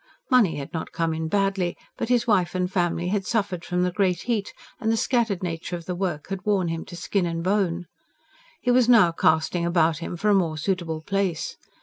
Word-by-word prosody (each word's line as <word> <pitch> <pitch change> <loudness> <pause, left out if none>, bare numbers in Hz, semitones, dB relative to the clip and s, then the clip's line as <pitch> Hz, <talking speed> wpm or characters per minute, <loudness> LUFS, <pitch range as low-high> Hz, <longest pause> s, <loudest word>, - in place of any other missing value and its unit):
Money 240 -9 +5
had 140 -1 -7
not 160 - -4
come 165 -1 -1
in 160 0 -3
badly; 195 -1 0 0.2
but - - -3
his 240 -1 +3
wife 190 -6 +2
and 180 0 0
family 175 -2 0
had 200 0 0
suffered 200 -5 -1
from 180 0 0
the 180 - +1
great 180 -2 0
heat, 220 -4 -1 0.3
and 220 - 0
the 225 - +1
scattered 225 -6 +1
nature 170 0 -3
of 170 -1 -8
the 180 - -3
work 175 -5 -3
had 195 0 -4
worn 195 -5 +1
him 165 0 -3
to 175 - -10
skin 180 +1 -1
and 165 0 -3
bone. 185 -2 0 0.8
He 245 - +2
was 245 -1 +4
now 215 -8 +7
casting 160 +1 +2
about 170 -2 +2
him 175 +1 -5
for 210 +5 +1
a - - +5
more 170 -5 +1
suitable 165 -2 -2
place. 195 -3 -1
180 Hz, 215 wpm, -25 LUFS, 170-200 Hz, 0.8 s, now